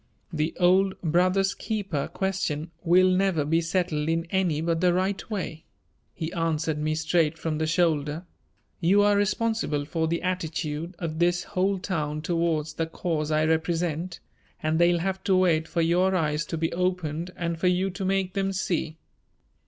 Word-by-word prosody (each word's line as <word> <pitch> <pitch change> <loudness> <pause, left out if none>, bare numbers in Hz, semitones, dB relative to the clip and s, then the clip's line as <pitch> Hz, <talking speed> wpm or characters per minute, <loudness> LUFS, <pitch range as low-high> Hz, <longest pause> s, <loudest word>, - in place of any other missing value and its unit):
"The 155 0 -1
old 190 +2 +3
'brother's 185 +4 +2
keeper' 195 -10 -3
question 170 -5 -2
will 180 +2 +5
never 185 -4 +2
be 165 +3 +2
settled 165 -3 -1
in 165 0 0
any 180 -6 +1
but 165 0 0
the 180 -1 +3
right 190 +3 -1
way," 180 -7 -4 0.5
he 165 -1 -4
answered 160 -2 -1
me 155 +1 0
straight 160 0 +1
from 160 -1 -2
the 160 - 0
shoulder. 160 -1 +1 0.5
"You 195 +4 +4
are 205 0 +4
responsible 205 -7 0
for 160 +1 -1
the 170 +2 -2
attitude 170 -2 -3
of 160 -2 -4
this 175 +1 +2
whole 195 0 0
town 155 -5 -3
towards 165 -2 0
the 165 +1 -2
cause 160 -2 -2
I 155 0 +2
represent 165 +1 -1 0.4
and 155 +1 +1
they'll 175 0 +4
have 190 +2 -2
to 190 - +3
wait 165 -4 +2
for 170 - 0
your 180 +3 +2
eyes 150 -3 0
to 165 - -3
be 165 +1 -1
opened 175 -2 -1
and 170 -1 -3
for 180 - +2
you 185 +2 +1
to 190 +2 -5
make 190 -1 0
them 195 0 -1
see." 170 -4 -2
170 Hz, 170 wpm, -26 LUFS, 160-185 Hz, 0.5 s, will